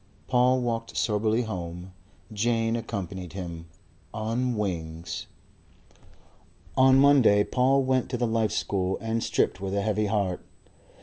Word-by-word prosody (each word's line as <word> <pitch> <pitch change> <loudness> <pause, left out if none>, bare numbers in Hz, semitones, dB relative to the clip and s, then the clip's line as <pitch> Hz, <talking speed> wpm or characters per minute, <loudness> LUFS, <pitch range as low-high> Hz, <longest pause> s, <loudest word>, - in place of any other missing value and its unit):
Paul 125 0 +3
walked 115 -1 -3
soberly 110 +2 +1
home. 90 -3 -6 0.4
Jane 115 +1 +1
accompanied 95 -6 -5
him 85 -3 -7 0.5
on 115 +2 -1
wings. 85 -5 -4 1.5
On 130 0 +6
Monday 135 -7 +5
Paul 135 +3 +2
went 130 -1 +1
to 125 - -2
the 120 - 0
Life 110 -1 0
School 95 -1 -1
and 115 +1 -2
stripped 95 - 0
with 95 0 -3
a 100 - 0
heavy 105 0 0
heart. 100 -3 -1
110 Hz, 125 wpm, -26 LUFS, 95-120 Hz, 1.5 s, On